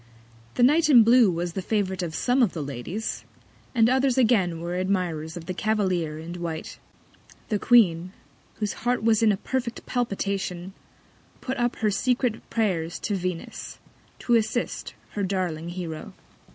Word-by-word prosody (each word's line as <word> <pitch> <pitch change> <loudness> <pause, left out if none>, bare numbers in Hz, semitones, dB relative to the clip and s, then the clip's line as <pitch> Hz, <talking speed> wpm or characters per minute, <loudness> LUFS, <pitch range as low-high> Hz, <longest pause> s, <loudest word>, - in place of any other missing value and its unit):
The 245 - +2
Knight 305 +5 +5
in 245 -6 +8
blue 235 -1 +6
was 170 0 -2
the 190 - -3
Favourite 190 -2 -1
of 165 -3 -4
some 250 +2 +2
of 225 -7 +3
the 160 - -3
Ladies; 140 - -4 0.5
and 225 -1 +5
others 260 +1 +2
again 200 -9 +3
were 170 +1 -4
Admirers 180 -4 -1
of 165 - -8
the 185 - -3
Cavalier 185 -7 0
in 165 +2 -7
white. 165 -2 -5 0.7
The 210 -3 0
Queen, 185 -8 +4 0.4
whose 210 -2 -2
Heart 245 0 0
was 225 -1 +3
in 220 -2 +5
a 200 - 0
perfect 245 +2 -3
Palpitation, 195 -6 -2 0.7
put 265 +1 -4
up 240 0 +1
her 215 -1 0
secret 250 +1 0
Prayers 180 -7 0
to 205 - -2
Venus 180 -2 -5 0.4
to 240 - -1
assist 230 +1 0 0.2
her 205 - -3
darling 180 -4 -2
Hero. 170 -3 -6
195 Hz, 155 wpm, -25 LUFS, 175-235 Hz, 0.7 s, in